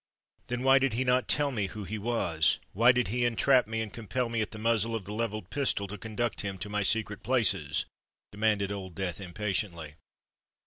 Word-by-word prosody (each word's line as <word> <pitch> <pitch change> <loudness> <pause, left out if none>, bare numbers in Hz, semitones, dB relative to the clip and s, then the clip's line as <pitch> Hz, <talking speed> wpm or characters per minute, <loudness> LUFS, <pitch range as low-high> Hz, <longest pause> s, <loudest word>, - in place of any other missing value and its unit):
"Then 125 +1 -3
why 135 +1 +6
did 135 -3 +1
he 125 +3 0
not 125 0 +2
tell 145 -1 +2
me 105 -6 -1
who 105 +3 -7
he 105 +3 -4
was?—why 105 +1 +2
did 125 -4 0
he 120 +3 0
entrap 120 +1 +3
me, 115 0 -2
and 110 -2 -5
compel 120 +2 -2
me 115 -1 0
at 110 - -2
the 110 - -9
muzzle 115 0 +1
of 105 -5 -4
the 105 - -6
levelled 110 -3 -3
pistol 135 -8 0
to 105 - -5
conduct 110 +3 -3
him 100 -2 -4
to 95 +3 -6
my 105 0 -1
secret 105 0 +1
places?" 105 - +1 0.5
demanded 105 -1 +1
Old 95 -3 -6
Death 95 -1 -3
impatiently. 90 -4 -3
110 Hz, 195 wpm, -29 LUFS, 100-120 Hz, 0.5 s, why